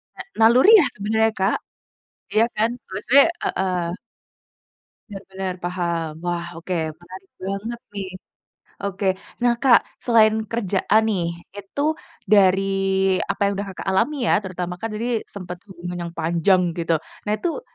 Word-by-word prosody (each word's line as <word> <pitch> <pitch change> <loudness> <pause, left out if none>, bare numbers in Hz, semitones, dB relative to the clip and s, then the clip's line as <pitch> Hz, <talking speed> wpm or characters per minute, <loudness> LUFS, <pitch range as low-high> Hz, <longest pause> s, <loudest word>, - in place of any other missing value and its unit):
Na - - -7 0.2
naluri 245 - +7
ya 300 - +4
sebenarnya, 220 +2 +1
Kak? 195 +3 +2 0.8
Iya 225 +2 +4
kan, 225 +2 +2 0.2
maksudnya 235 +9 +4 0.2
heeh. 180 -2 -1 1.2
Benar 195 -1 -8
benar, 190 -1 -3
paham, 170 -2 -2 0.2
wah 175 -1 -1
oke, 180 +2 -4 0.3
menarik 185 +2 -12
banget 200 +5 -4 0.2
nih, 195 -2 -4 0.7
oke. 200 0 -3 0.4
Nah, 240 - +5
Kak, 255 -4 +7 0.3
selain 220 -2 +4
kerjaan 215 -1 +2
nih, 190 -6 0 0.3
itu 200 +8 -5 0.5
dari 195 -1 +5 0.7
apa - - -3
yang 200 - +1
udah, 200 0 -4
Kakak 190 - -8
alami 235 +10 +2
ya, 210 - +3
terutama 180 -2 -4
kan 225 - -2
tadi 225 +1 -2
sempet 180 -3 -8
hubungan 175 -1 -7
yang - - -13
panjang 170 +2 +2
gitu. 165 -1 0 0.3
Nah, - - +2
itu, 345 - -3
195 Hz, 140 wpm, -22 LUFS, 180-220 Hz, 1.2 s, naluri